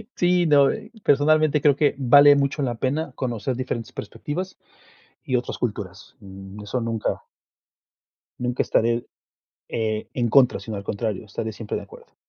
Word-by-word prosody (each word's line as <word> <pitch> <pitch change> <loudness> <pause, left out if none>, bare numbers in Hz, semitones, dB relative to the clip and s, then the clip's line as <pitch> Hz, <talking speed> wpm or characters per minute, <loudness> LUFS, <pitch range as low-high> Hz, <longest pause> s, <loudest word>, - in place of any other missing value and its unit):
Sí, 175 0 +2
no, 145 -3 +5
eh, - - -8
personalmente 150 +1 +3
creo 145 -2 +4
que 145 0 +2
vale 145 +2 +7
mucho 140 +1 0
la 120 -3 -1
pena, 140 +5 -2
conocer 125 -1 -3
diferentes 120 -3 -4
perspectivas 145 - -6 0.7
y 130 - 0
otras 125 - -4
culturas, 100 -5 -5
mm, 95 0 -11
eso 105 +5 -3
nunca 115 - -2 1.2
nunca 125 0 0
estaré, 115 +1 +1 0.6
eh, 110 -1 -2
en 120 -2 0
contra, 125 +2 +4
sino 110 -2 -6
al 100 - -7
contrario, 105 0 -3
estaré 110 +2 -5
siempre 110 0 -5
de - - -4
acuerdo. 470 +1 -16
125 Hz, 150 wpm, -23 LUFS, 110-145 Hz, 1.2 s, vale